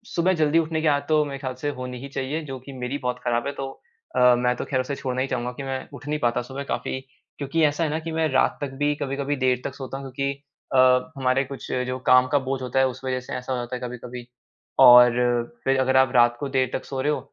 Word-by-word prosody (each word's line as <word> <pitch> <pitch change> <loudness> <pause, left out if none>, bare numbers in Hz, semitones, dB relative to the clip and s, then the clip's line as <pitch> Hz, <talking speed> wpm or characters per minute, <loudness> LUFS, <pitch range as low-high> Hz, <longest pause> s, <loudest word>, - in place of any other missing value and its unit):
सुबह 180 +2 +3
जल्दी 155 +2 +4
उठने 160 -1 -1
की 160 - +1
आदत 145 -1 +2
तो 155 -1 +4
मेरे 140 -1 -5
ख्याल 130 -2 -4
से 145 - -1
होनी 125 0 -5
ही 140 - -6
चाहिए 135 +4 -3
जो 135 -2 -6
कि 135 +2 -11
मेरी 125 +2 -4
बहुत 125 -2 -3
ख़राब 120 +1 0
है - - -1
तो 135 0 -5 0.5
अ, 125 -1 +6
मैं 125 0 +1
तो - - -4
खैर 130 -2 0
उसे 140 +2 -4
छोड़ना 130 -1 -3
ही 135 - 0
चाहूँगा 125 -1 -2
कि 140 - -7
मैं 135 -1 -4
उठ 145 - -10
नहीं 150 0 -1
पाता 120 -2 +1
सुबह 135 +3 -6
काफ़ी 130 - -3 0.4
क्योंकि 145 +3 -1
ऐसा 145 +3 +1
है 160 - 0
ना 155 +2 -1
कि 165 0 -6
मैं 160 0 +1
रात 130 - +2
तक 145 - -2
भी 145 0 +2
कभी-कभी 140 0 -2
देर 125 -1 +2
तक 135 - -4
सोता 135 0 -6
हूँ 135 -1 -8
क्योंकि 140 +2 -1 0.4
अ, - - +5 0.4
हमारे 130 0 +2
कुछ 135 +1 -8 0.2
जो 130 0 -3
काम 130 0 +6
का 145 - +4
बोझ 135 0 -3
होता 130 +1 -1
है, 135 - +4
उस 130 - -7
वजह 130 -1 -1
से 130 - -9
ऐसा 125 +1 -4
हो - - -1
जाता 120 +1 -4
है 125 - -6
कभी-कभी 125 0 -7 0.5
और 125 0 +9 0.5
फिर 135 0 +2
अगर 130 0 +3
आप 130 -1 +4
रात 120 0 +5
को 140 - -3
देर 130 -2 +1
तक - - -3
सो 135 -1 -4
रहे 145 +3 +1
हो, 150 - -1
130 Hz, 265 wpm, -24 LUFS, 125-145 Hz, 0.5 s, और